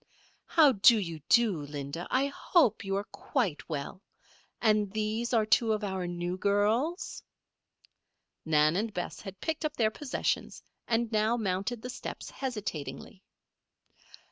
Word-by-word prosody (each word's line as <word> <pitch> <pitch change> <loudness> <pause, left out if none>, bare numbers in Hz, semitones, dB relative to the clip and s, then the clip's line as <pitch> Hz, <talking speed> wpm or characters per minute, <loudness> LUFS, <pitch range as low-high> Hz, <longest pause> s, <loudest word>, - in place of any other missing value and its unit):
"How 310 -4 +6
do 230 +1 +6
you 165 -6 -4
do, 230 -5 +5
Linda? 145 +3 -6
I 265 +2 +2
hope 280 - +2
you 195 0 -2
are 200 - -1
quite 205 - -3
well. 150 +4 -5 0.6
And 215 -3 +2
these 220 +2 -2
are 225 -3 +3
two 220 +1 +3
of 215 0 -2
our 190 -3 -2
new 175 +1 -3
girls?" 215 - 0 1.2
Nan 155 0 +3
and 220 +2 -1
Bess 180 -3 -5
had 195 -2 -9
picked 320 0 -2
up 305 -1 -2
their 220 -2 +3
possessions 285 +3 -2 0.2
and 235 0 +1
now 220 +2 +2
mounted 205 +2 -2
the 250 - -4
steps - - -7
hesitatingly. 210 - -5
215 Hz, 140 wpm, -30 LUFS, 185-235 Hz, 1.2 s, How